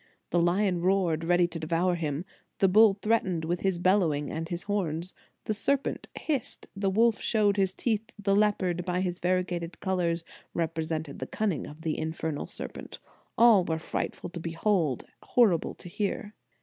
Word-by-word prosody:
The 175 - +3
lion 180 +1 +2
roared, 180 -3 +2
ready 175 0 +4
to 170 -1 -6
devour 165 +3 +1
him; 160 -1 -2 0.3
the 195 - +4
bull 205 +1 +6
threatened 190 -7 +1
with 175 +2 -1
his 190 -2 +1
bellowing 170 -6 +2
and 165 +1 -4
his 175 0 -4
horns; 180 -4 -2 0.3
the 215 - 0
serpent 275 +6 -1
hissed; 285 -7 -3
the 195 0 0
wolf 225 +2 +3
showed 210 -3 +2
his 190 -2 +1
teeth; 225 -1 -1
the 200 -1 +1
leopard, 190 -4 +2
by 180 0 -1
his 180 -1 -2
variegated 180 -1 -1
colors, 175 -3 0 0.3
represented 160 -2 -2
the - - -4
cunning 200 -9 -1
of 150 +2 -11
the 160 -2 -1
infernal 160 -1 -3
ser - - -6
pent: - - -9 0.4
all 230 -5 +7
were 160 -2 -1
frightful 165 +2 -4
to 175 - -6
behold, 165 - 0 0.2
horrible 205 -10 +2
to - - -12
hear. 205 +2 -3
180 Hz, 165 wpm, -28 LUFS, 165-205 Hz, 0.4 s, all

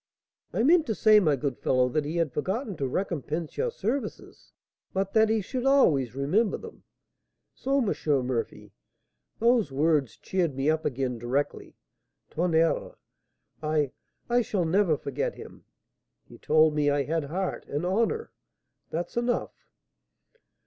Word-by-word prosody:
'I - - 0
meant 320 +3 +4
to 220 - -1
say, 215 +1 +6
my 155 -7 +3
good 135 -2 -3
fellow, 130 -1 +2
that 150 +3 -1
he 155 +3 -4
had 165 -6 0
forgotten 200 - -2
to 135 - -1
recompense 160 0 -3
your 485 - 0
services, 260 - -5 0.4
but 195 0 -1
that 220 -1 +4
he 220 -1 +2
should 250 +6 -4
always 155 - +3
remember 185 +11 +1
them.' - - -12 0.7
So, 275 +1 -1
M. - - +2 0.3
Murphy, 125 -2 -3 0.7
those 230 - +3
words 140 -5 +1
cheered 170 -4 -1
me 135 +3 +2
up 160 0 -2
again 125 -2 -2
directly. 130 +5 -2 0.6
Tonnerre! 165 -1 +1 0.7
I 155 -3 0 0.4
I 245 +1 +3
shall 195 -6 -1
never 170 -2 +2
forget 140 -2 -3
him. - - -12 0.6
He - - -15
told 155 0 +4
me 150 -1 +2
I 145 0 +1
had 160 0 -1
heart 185 +6 -3
and 145 +4 -3
honour, 230 - 0 0.6
that's 170 +2 -4
enough." 240 +1 0
165 Hz, 140 wpm, -27 LUFS, 145-215 Hz, 0.7 s, say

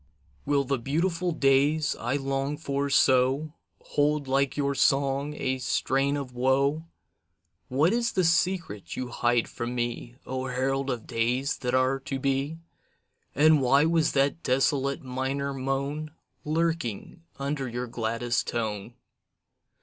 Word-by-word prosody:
Will 140 -1 +2
the 135 -1 -1
beautiful 170 +7 0
days 145 +1 +2
I 120 +4 -1
long 135 +1 -2
for 140 -2 -2
so 135 +3 +3 0.3
Hold 145 -1 0
like 135 +1 +1
your 140 -1 +1
song 140 +2 +1
a 130 -2 -2
strain 135 +3 0
of 135 -3 -6
woe? 140 +5 +1 0.8
What 150 - +2
is 235 0 0
the 185 - +2
secret 165 - 0
you 125 -1 -4
hide 120 -1 +1
from 120 +1 -5
me 120 0 -3
O 130 0 -3
herald 135 +2 -1
of 120 -4 -3
days 125 +5 0
that 125 -1 -1
are 130 +1 +2
to 135 0 -4
be? 135 +3 -1 0.8
And 155 +1 +5
why 135 +3 +4
was 165 -1 +2
that 140 +4 +1
desolate 135 +1 +1
minor 135 +2 -2
moan 135 +3 -2 0.3
Lurking 160 - -2 0.2
under 140 -1 -3
your 120 +1 -3
gladdest 115 +1 -2
tone? 110 -1 -3
135 Hz, 135 wpm, -27 LUFS, 125-145 Hz, 0.8 s, And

